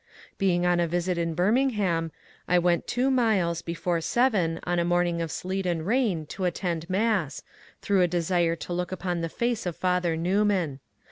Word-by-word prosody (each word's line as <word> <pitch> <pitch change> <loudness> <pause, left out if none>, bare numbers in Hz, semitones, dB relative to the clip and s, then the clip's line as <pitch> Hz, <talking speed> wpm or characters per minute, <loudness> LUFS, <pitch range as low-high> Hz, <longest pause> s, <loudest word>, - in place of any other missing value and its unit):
Being 180 -3 +2
on 175 0 +3
a 170 - +2
visit 175 +1 -1
in 165 -1 -1
Birmingham, 195 -5 +1 0.4
I 180 - +3
went 175 0 +1
two 255 +2 +1
miles 205 -10 +2
before 170 0 -2
seven 175 -3 +1
on 175 0 0
a - - +2
morning 175 -1 +1
of 165 - -2
sleet 190 +3 -3
and 165 -2 -1
rain 210 -8 +1
to 185 +5 -4
attend 170 -1 -2
mass, 195 -6 0 0.4
through 200 -2 +2
a 180 - +4
desire 170 0 +1
to 175 - -6
look 180 +1 -2
upon 180 -2 -2
the 165 - -2
face 235 0 -1
of 175 - -3
Father 180 -2 0
Newman. 180 -4 +1
175 Hz, 180 wpm, -26 LUFS, 170-195 Hz, 0.4 s, a